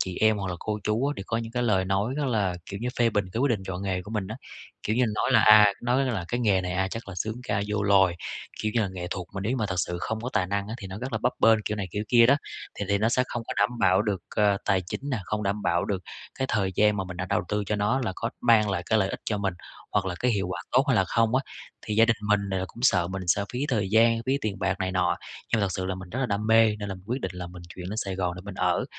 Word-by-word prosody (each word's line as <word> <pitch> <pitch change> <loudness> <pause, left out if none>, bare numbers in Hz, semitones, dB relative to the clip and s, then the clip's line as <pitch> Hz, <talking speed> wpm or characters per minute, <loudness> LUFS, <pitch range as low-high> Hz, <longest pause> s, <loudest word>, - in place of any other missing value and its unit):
chị 90 -1 -2
em 110 0 +4
hoặc 95 -1 -3
là 90 - -2
cô 105 -1 -2
chú 110 +5 +1
á, 145 - 0
đều 100 - -6
có 115 - -1
những 115 0 -4
cái 125 0 0
lời 95 -5 +2
nói 100 +7 0
rất 150 - -1
là 105 -7 +1
kiểu 100 +1 -6
như, 125 - -2
phê 120 -1 +4
bình 105 -2 +1
cái 115 - -2
quyết 140 - +3
định 105 -4 0
chọn 95 0 -4
nghề 95 -2 -1
của 105 - -10
mình 105 -4 -2
á. 110 - -5 0.5
Kiểu 110 - 0
như 125 - +4
nói - - 0
là - - +7
à 105 -1 +8
nói 125 +3 +2
là: 110 -9 -2
"Cái 120 +1 -1
nghề 100 -5 +3
này, 90 0 -3
à, 95 +1 0
chắc 115 +1 -7
là 100 - -7
xướng 105 +5 -2
ca 105 -5 -1
vô 105 -1 0
loài, 95 -3 +4 0.5
kiểu 110 0 -1
như 120 - +3
là 105 - 0
nghệ 90 -1 -5
thuật 90 -3 -4
mà 95 - -3
nếu 105 +4 -1
như 130 - 0
mà 110 -4 0
thật 95 - -3
sự 90 0 -1
không 110 0 -3
có 120 - -3
tài 90 - +1
năng 100 +2 -2
á 110 - -4
thì 100 - -7
nó 95 +2 -7
rất 130 +3 -5
là 110 - 0
bấp 125 - +2
bênh", 110 -1 +5
kiểu 105 - -2
này 100 -2 -3
kiểu 105 +3 -3
kia 120 -1 +6
đó. 140 +2 +5 0.4
Thì 100 - -3
thì 100 0 +2
nó 110 +2 +2
sẽ 125 +1 +2
không 120 - -3
có - - -4
đảm 105 +4 +1
bảo 95 0 +4
được, 105 -4 -1 0.2
ờ, 105 -1 +4
tài 95 -2 +2
chính 90 - -5
nè, 125 - 0
không 105 +3 -2
đảm 100 +1 -1
bảo 85 0 +1
được 95 -2 -2 0.4
cái 130 - 0
thời 95 -3 0
gian 105 0 +4
mà 95 - -2
mình 90 -1 -8
đã 90 +1 -3
đầu 110 +1 +1
tư 105 0 0
cho 105 - 0
nó, 105 +6 +1
là 100 - -1
có 115 - -2
mang 110 -3 +4
lại 90 -3 -1
cái 110 - +3
lợi 95 -2 +2
ích - - -5
cho 105 - -1
mình, 95 -3 -1 0.4
hoặc 100 -2 +1
là 90 - -2
cái 125 - +2
hiệu 100 -2 0
quả 90 -1 -4
tốt 130 +2 +5
hay 135 - +4
là 95 - +4
không 115 +4 +1
á, 135 - +2 0.4
thì 105 - -1
gia 115 +2 +6
đình 115 -1 +2
mình, 100 -2 +2
à, 95 -1 -1
cũng 120 - -12
sợ 90 -9 +3
mình 95 0 -4
sẽ 100 +4 +2
phí 125 +3 -1
thời 105 -7 0
gian, 115 +1 +4
phí 135 +2 +2
tiền 105 -5 -3
bạc 95 -1 +1
này 95 0 -1
nọ. 90 -1 +1 0.4
Nhưng 115 - +3
mà - - +2
thật 100 - -1
sự 95 0 -3
là 95 - -2
mình 95 -1 -9
rất 125 - -4
là 130 - +1
đam 105 -1 -2
mê, 110 -1 +5
nên 100 -1 -5
là 95 - -3
mình 95 0 -14
quyết 125 +4 -2
định 95 -4 -3
là 90 0 -5
mình 90 0 -11
chuyển 90 0 -7
lên 105 - -4
Sài 100 -4 -2
Gòn 90 -2 -1
để - - -7
mình 100 -1 -7
ở, 90 -5 +1
105 Hz, 325 wpm, -26 LUFS, 95-115 Hz, 0.5 s, à